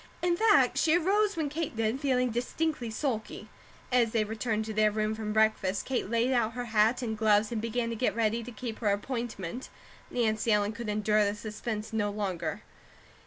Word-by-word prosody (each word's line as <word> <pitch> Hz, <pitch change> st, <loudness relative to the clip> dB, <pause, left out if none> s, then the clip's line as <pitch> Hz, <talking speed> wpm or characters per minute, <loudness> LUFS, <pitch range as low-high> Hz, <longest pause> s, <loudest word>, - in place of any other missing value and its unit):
In 350 Hz, -1 st, +3 dB
fact, 440 Hz, +3 st, +4 dB
she 325 Hz, +1 st, +4 dB
arose 400 Hz, +3 st, +1 dB
when 315 Hz, -2 st, 0 dB
Kate 300 Hz, -4 st, -4 dB
did, 225 Hz, +3 st, 0 dB
feeling 255 Hz, -3 st, +1 dB
distinctly 250 Hz, +2 st, -2 dB
sulky. 220 Hz, -1 st, -3 dB, 0.4 s
As 240 Hz, -3 st, +3 dB
they 225 Hz, -2 st, +3 dB
returned 220 Hz, 0 st, -2 dB
to 220 Hz, -, -5 dB
their 215 Hz, 0 st, +4 dB
room 215 Hz, 0 st, -1 dB
from 215 Hz, -1 st, -4 dB
breakfast, 215 Hz, -3 st, +1 dB
Kate 250 Hz, -7 st, -2 dB
laid 235 Hz, +3 st, +1 dB
out 235 Hz, -2 st, +1 dB
her 245 Hz, 0 st, -4 dB
hat 220 Hz, +2 st, +2 dB
and 220 Hz, -2 st, -2 dB
gloves 215 Hz, 0 st, +3 dB
and 225 Hz, -2 st, -2 dB
began 230 Hz, +1 st, -1 dB
to -, -, -3 dB
get 215 Hz, -3 st, 0 dB
ready 230 Hz, 0 st, +1 dB
to 240 Hz, +2 st, -8 dB
keep 230 Hz, -1 st, -6 dB
her 215 Hz, -, +1 dB
appointment. 230 Hz, 0 st, -3 dB, 0.4 s
Nancy 225 Hz, -1 st, 0 dB
Ellen 205 Hz, 0 st, +2 dB
could 220 Hz, 0 st, -6 dB
endure 210 Hz, 0 st, +2 dB
the 205 Hz, 0 st, 0 dB
suspense 215 Hz, +1 st, -5 dB
no 210 Hz, -2 st, +1 dB
longer. 200 Hz, -2 st, -3 dB
220 Hz, 190 wpm, -29 LUFS, 215-245 Hz, 0.4 s, fact